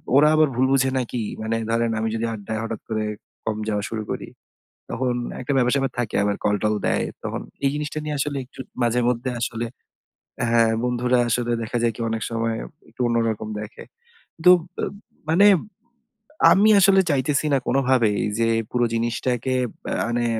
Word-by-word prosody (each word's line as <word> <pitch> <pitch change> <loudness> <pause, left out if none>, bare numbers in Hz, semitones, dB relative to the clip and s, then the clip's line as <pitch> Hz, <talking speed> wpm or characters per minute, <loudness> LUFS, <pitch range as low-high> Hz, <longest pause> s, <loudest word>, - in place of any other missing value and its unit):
"ওরা 150 +2 +7
আবার 155 0 +5
ভুল 130 - +3
বুঝে 135 -1 +3
নাকি"? 120 -1 -3 0.2
মানে 110 +1 -1
ধরেন 115 0 +1
আমি 110 0 0
যদি 115 +1 -1
আড্ডায় 110 +1 -4
হঠাৎ 115 -1 -5
করে 110 -1 -1 0.4
কম 110 -1 -1
যাওয়া 105 -1 -1
শুরু 110 -1 -3
করি, - - -4 0.6
তখন 125 0 -1 0.3
একটা 130 +3 -2
ব্যাপার 125 -1 +3
স্যাপার 135 -2 0
থাকে 120 -3 -2
আবার 100 0 0
কলটল 105 +1 +1
দেয়। - - +1 0.2
তখন - - -3 0.2
এই 135 - +4
জিনিসটা 150 +1 -3
নিয়ে 150 -1 -2
আসলে 145 +1 -1
একটু 130 - -14 0.2
মাঝে 120 +1 +2
মধ্যে 125 +1 -1
আসলে 115 0 -2 0.8
হ্যাঁ, 115 -1 +4
বন্ধুরা 125 0 +1
আসলে 120 +1 0
দেখা 115 +2 -2
যায় 115 -1 +2
কি - - -6
অনেক 110 0 -2
সময় 115 0 -1 0.3
একটু - - -29
অন্যরকম 115 -2 0
দেখে। 105 0 -8 0.6
তুব 180 0 +8 0.2
আ - - +2 0.4
মানে 175 +6 +5 1.1
আমি 205 +3 +5
আসলে 195 0 +6
চাইতেছি 140 +1 +1
না - - +4
কোনভাবেই 125 -6 +2 0.2
যে, 115 0 +2 0.2
পুরো 120 -1 +1
জিনিসটাকে 120 +2 -1 0.3
ব্য - - -6 0.2
মানে 120 0 0
120 Hz, 170 wpm, -23 LUFS, 115-130 Hz, 1.1 s, তুব